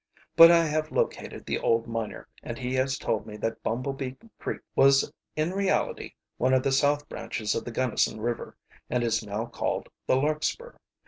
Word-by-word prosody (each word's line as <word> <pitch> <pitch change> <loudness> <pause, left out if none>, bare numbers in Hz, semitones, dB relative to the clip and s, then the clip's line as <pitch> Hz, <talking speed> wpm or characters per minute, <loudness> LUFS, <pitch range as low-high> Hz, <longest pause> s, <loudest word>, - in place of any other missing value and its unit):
But 165 0 +11
I 170 -1 +5
have 155 0 -1
located - - -2
the - - -1
old 115 0 +2
miner, 115 -2 -5
and - - -6
he 125 0 -3
has 130 +1 +1
told 110 - -2
me 105 -1 -8
that 115 +1 -3
Bumble 130 +5 -2
Bee 135 -1 -5 0.2
Creek - - -4
was 135 0 +5 0.2
in 155 +3 0
reality 195 0 -1 0.2
one 130 +1 +3
of 130 - +2
the 135 - +1
south 145 +2 +2
branches 105 -2 -3
of - - -3
the 120 - -5
Gunnison 120 -2 0
River, 120 +2 -3 0.3
and 125 -1 0
is 115 -1 +1
now 105 +2 -3
called 120 - -3 0.2
the - - +4
Larkspur. 155 - -1
130 Hz, 185 wpm, -27 LUFS, 115-145 Hz, 0.3 s, But